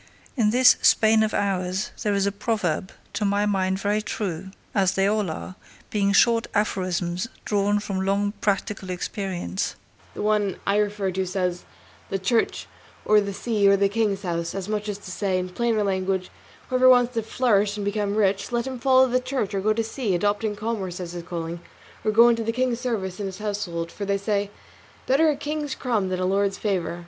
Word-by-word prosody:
In 225 -6 +3
this 250 +3 +6
Spain 220 0 +5
of 220 0 +1
ours 190 -1 -1
there 205 -1 +1
is 200 0 +1
a 200 - +1
proverb, 200 -4 -2 0.2
to 210 - -2
my 205 0 +2
mind 190 -2 +1
very 205 +2 0
true 190 -4 -4 0.2
as 190 -2 +2
they 195 - +2
all 210 -2 +1
are, 160 +3 -6 0.4
being 200 -2 +2
short 230 +3 +4
aphorisms 185 -2 -1 0.2
drawn 205 0 +1
from 195 -2 -3
long 200 +1 +1
practical 195 -1 -1
experience 180 - -3 0.4
and - - -4
the - - -1
one 210 -2 +1
I 200 +1 +2
refer 205 -2 0
to 190 +1 -2
says, 180 -1 -2 0.4
'The 195 - -1
church, 200 +5 0 0.4
or 210 0 +5
the 200 0 -3
sea, 205 0 +1
or 200 - +5
the 200 0 +2
king's 205 -2 0
house;' 170 -1 -2
as 195 -1 -4
much 210 0 -2
as 205 - -3
to 195 -2 -10
say, 190 -1 0
in 185 0 -2
plainer 225 +2 0
language, 190 -1 -1 0.4
whoever 255 0 +5
wants 245 -1 +5
to 230 - 0
flourish 210 -3 +1
and 205 - -3
become 205 0 -1
rich, 200 +1 +1
let 240 0 0
him 260 -2 -5
follow 260 +1 +5
the 255 0 +1
church, 255 -5 -2
or 195 - -1
go 215 +2 +2
to 225 +1 +1
sea, 225 -3 -2
adopting 205 +3 0
commerce 205 -4 -3
as 175 -2 -5
his 175 0 -6
calling, 170 0 -5 0.4
or 220 - +1
go 230 +3 +7
into 230 -1 +2
the 225 - 0
king's 250 0 0
service 215 -7 -3
in 200 - -2
his 190 -1 -7
household, 195 -6 -3
for 200 - -5
they 200 0 +1
say, 200 0 -1 0.6
'Better 300 +5 +4
a 300 - +1
king's 295 -1 -3
crumb 220 -7 -1
than 185 -1 -2
a 185 - 0
lord's 195 +1 +1
favour. 180 -4 -2
205 Hz, 200 wpm, -24 LUFS, 190-220 Hz, 0.6 s, go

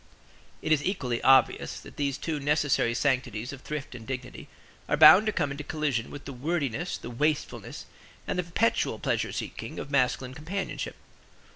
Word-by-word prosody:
It 160 - -1
is 150 -2 +4
equally 130 -11 -1
obvious 130 -2 +4
that - - -13
these 140 -2 -1
two 160 -3 -3
necessary 145 -4 +1
sanctities 125 -2 0
of 135 - -10
thrift 150 -2 -5
and 115 -2 -10
dignity 125 -1 -6 0.4
are - - +2
bound 210 +4 +9
to - - +3
come 145 -8 -1
into 140 +2 -5
collision 150 -6 -1
with 145 - -9
the 140 - -6
wordiness, 150 +2 -2
the 120 - -8
wastefulness, 150 +5 -2 0.4
and - - -2
the - - +1
perpetual 190 +7 +1
pleasure - - -1
seeking - - -6
of 140 - -6
masculine 130 -1 +1
companionship. 170 +8 -4
140 Hz, 165 wpm, -28 LUFS, 125-155 Hz, 0.4 s, bound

